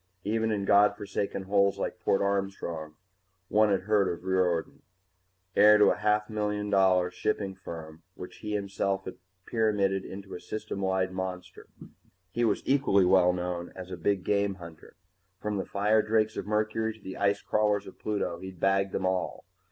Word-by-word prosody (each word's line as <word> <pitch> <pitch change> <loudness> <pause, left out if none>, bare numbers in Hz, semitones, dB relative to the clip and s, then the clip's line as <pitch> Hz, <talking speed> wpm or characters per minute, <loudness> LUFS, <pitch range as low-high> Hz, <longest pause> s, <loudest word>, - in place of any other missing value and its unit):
Even 110 +2 0
in 100 -2 -1
God 100 +1 +5
forsaken 100 -1 -3
holes 100 0 +2
like - - -4
Port 95 - +1
Armstrong 95 -6 -2 0.5
one 110 0 +4
had 100 -2 +2
heard 100 0 +2
of 85 0 -7
Riordan. 90 -3 0 0.7
Heir 105 +1 +7
to 105 -1 +6
a 105 0 +1
million 105 -1 -2
dollar 95 -2 +3
shipping 100 +1 -2
firm 80 -4 -9
which 90 - -9
he 105 -1 -5
himself 100 -1 -2
had 95 - -7 0.3
pyramided 100 -4 +1
into 95 0 -9
a - - -6
System 100 +2 -5
wide 95 -1 0
monster, 90 -1 -6 0.6
he 120 - -1
was 110 -3 +1
equally 130 -9 +3
well 90 -1 +5
known 90 -1 -4
as 95 0 -8
a - - -3
big 95 +2 0
game 100 -1 +1
hunter. 85 -3 -13 0.4
From 105 0 -2
the 95 - -2
firedrakes 110 +2 +2
of - - -5
Mercury 110 +1 0
to 105 - -23
the 95 - -7
ice 100 0 +1
crawlers 105 -1 +1
of - - -12
Pluto, 100 -5 -2
he'd 95 -1 -9
bagged 95 +1 +1
them - - -1
all. 95 0 -2
100 Hz, 165 wpm, -28 LUFS, 95-105 Hz, 0.7 s, Heir